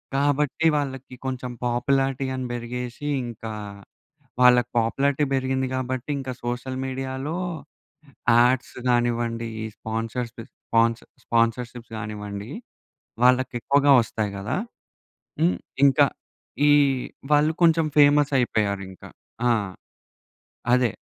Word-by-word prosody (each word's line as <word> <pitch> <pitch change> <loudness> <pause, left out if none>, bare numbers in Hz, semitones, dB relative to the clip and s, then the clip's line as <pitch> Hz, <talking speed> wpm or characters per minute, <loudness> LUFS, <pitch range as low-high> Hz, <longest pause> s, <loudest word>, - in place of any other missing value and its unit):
కాబట్టి, 145 +2 +1
వాళ్ళకి 135 -2 -4
కొంచెం 130 -1 -3
పాపులారిటీ 135 +2 +1
అని 130 - -3
పెరిగేసి, 125 +3 -6 0.2
ఇంకా 115 -1 -7 0.9
వాళ్ళకి 125 -1 +6
పాపులారిటీ 140 +5 +1
పెరిగింది 130 0 0
కాబట్టి, 130 +1 -3
ఇంకా 130 -1 -4
సోషల్ 125 +2 -3
మీడియాలో 130 +3 -4 1.0
యాడ్స్ 125 +2 +3
గానివ్వండి, 120 -1 0 0.2
ఈ - - -3
స్పాన్సర్స్‌ప్ 115 +2 -4 0.2
స్పాన్ 115 0 +3 0.3
స్పాన్సర్స్‌షిప్స్ 115 0 -1
గానివ్వండి, 105 -1 -6 0.8
వాళ్ళకి 130 +1 +4
ఎక్కువగా 140 +2 +4
వస్తాయి 110 -2 -3
గదా! 105 +5 -2 0.8
హ్మ్, 170 +2 +3 0.3
ఇంకా 140 +1 +5 0.6
ఈ - - +6 0.6
వాళ్ళు 150 +2 +4
కొంచెం 165 -1 +4
ఫేమస్ 145 0 +5
అయిపోయారు 105 -4 0
ఇంకా. 95 - -12 0.4
ఆ! - - +4 1.2
అదే. 125 -4 +2
125 Hz, 100 wpm, -24 LUFS, 115-135 Hz, 1.2 s, వాళ్ళకి